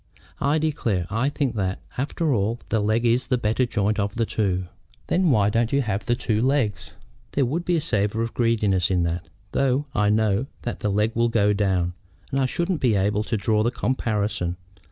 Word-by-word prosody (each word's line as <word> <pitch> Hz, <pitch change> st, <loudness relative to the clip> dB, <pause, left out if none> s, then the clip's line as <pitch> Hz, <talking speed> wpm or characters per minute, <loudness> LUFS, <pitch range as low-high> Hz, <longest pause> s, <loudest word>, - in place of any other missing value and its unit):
"I 145 Hz, +3 st, +2 dB
declare 120 Hz, -, 0 dB
I 115 Hz, +6 st, +1 dB
think 140 Hz, -4 st, -1 dB
that, 95 Hz, -1 st, -1 dB, 0.2 s
after 145 Hz, +3 st, 0 dB
all, 110 Hz, +2 st, 0 dB
the 110 Hz, -, +1 dB
leg 110 Hz, +3 st, +1 dB
is 120 Hz, +2 st, +2 dB
the 125 Hz, -, +2 dB
better 120 Hz, +2 st, +1 dB
joint 105 Hz, -1 st, 0 dB
of 100 Hz, +1 st, -1 dB
the 115 Hz, 0 st, +1 dB
two." 95 Hz, -5 st, -1 dB, 0.4 s
"Then 180 Hz, -1 st, +2 dB
why 105 Hz, -6 st, +3 dB
don't 115 Hz, +1 st, +1 dB
you 140 Hz, 0 st, +2 dB
have 100 Hz, -3 st, -3 dB
the 120 Hz, -, +3 dB
two 110 Hz, -3 st, 0 dB
legs?" 130 Hz, -6 st, 0 dB, 0.4 s
"There 140 Hz, -, +2 dB
would 155 Hz, +8 st, -2 dB
be 175 Hz, -, +2 dB
a 165 Hz, -, +1 dB
savor 105 Hz, -2 st, 0 dB
of 115 Hz, -, -4 dB
greediness 105 Hz, -7 st, +2 dB
in 90 Hz, -2 st, +2 dB
that, 85 Hz, +2 st, -3 dB, 0.2 s
though 135 Hz, +1 st, +1 dB
I 105 Hz, -1 st, +2 dB
know 110 Hz, +3 st, +2 dB, 0.2 s
that 120 Hz, -, -4 dB
the 105 Hz, -, -1 dB
leg 105 Hz, +3 st, +1 dB
will 120 Hz, 0 st, +2 dB
go 105 Hz, -3 st, +3 dB
down, 95 Hz, -4 st, 0 dB, 0.4 s
and 135 Hz, -, 0 dB
I 130 Hz, -, +2 dB
shouldn't 170 Hz, +3 st, -1 dB
then 125 Hz, -, +3 dB
be 110 Hz, -, +2 dB
able 100 Hz, +2 st, +1 dB
to 110 Hz, +1 st, -2 dB
draw 105 Hz, +1 st, +1 dB
the 115 Hz, -, +2 dB
comparison. 105 Hz, -8 st, -1 dB
110 Hz, 210 wpm, -24 LUFS, 100-130 Hz, 0.4 s, why